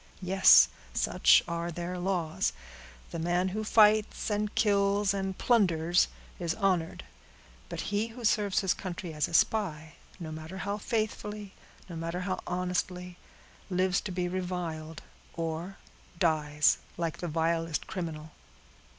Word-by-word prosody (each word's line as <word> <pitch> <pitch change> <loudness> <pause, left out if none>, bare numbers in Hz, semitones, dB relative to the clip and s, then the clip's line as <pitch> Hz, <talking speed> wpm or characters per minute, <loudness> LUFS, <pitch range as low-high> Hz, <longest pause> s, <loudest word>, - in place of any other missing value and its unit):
Yes, 190 +1 +7 0.3
such - - +4
are 170 0 -3
their 175 +2 -4
laws; 175 -4 -1 0.6
the 170 - -4
man 175 +3 +1
who 215 +3 -3
fights, 215 0 +3
and 210 0 -1
kills, 200 -1 +2
and 190 -1 -3
plunders, 175 -7 +3 0.3
is 170 -2 -1
honored; 185 - 0 0.7
but - - -4
he 210 +2 +1
who 230 +1 -8
serves 205 -2 +2
his 190 -2 +2
country 175 -2 -6
as 150 -1 0
a - - -11
spy, 160 -9 +1 0.3
no 160 -3 -6
matter 160 +4 -7
how 205 +1 -2
faithfully, 210 -2 -3 0.3
no 175 - -8
matter 165 +2 -3
how 185 0 -2
honestly, 180 0 -2 0.5
lives 185 0 +1
to 200 - -5
be 180 -1 -1
reviled, 175 -4 -4 0.3
or 165 +3 -4 0.4
dies 155 -3 +2 0.2
like 165 -2 -3
the 175 - -3
vilest 165 0 -1
criminal!" 160 -4 -5
180 Hz, 135 wpm, -29 LUFS, 165-200 Hz, 0.7 s, Yes